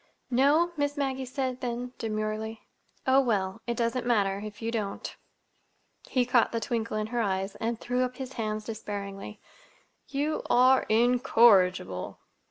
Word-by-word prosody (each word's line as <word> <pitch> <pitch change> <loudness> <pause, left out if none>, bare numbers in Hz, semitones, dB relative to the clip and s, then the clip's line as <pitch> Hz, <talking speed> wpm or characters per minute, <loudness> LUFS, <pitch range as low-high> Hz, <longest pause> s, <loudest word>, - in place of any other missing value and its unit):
"No?" 290 +7 +4
Miss 290 0 -1
Maggie 265 -2 -1
said 255 -1 -3
then, 245 0 -4
demurely. 215 0 -3 0.4
"Oh, 265 +1 +5
well—it 225 -1 -1
doesn't 235 +1 0
matter—if 205 -3 0
you 230 0 -3
don't." 210 -4 -4 0.9
He 255 -2 +2
caught 240 -1 +3
the 230 - -1
twinkle 230 -3 -2
in 215 - -1
her 240 +2 -1
eyes 195 -1 -1
and 230 0 -2
threw 250 +1 -1
up 250 0 -3
his 265 0 -7
hands 215 -2 -3
despairingly. 205 -2 -6 0.7
"You 290 +2 -1
are 255 +2 +5
incorrigible!" 215 - +3
235 Hz, 135 wpm, -28 LUFS, 215-255 Hz, 0.9 s, Oh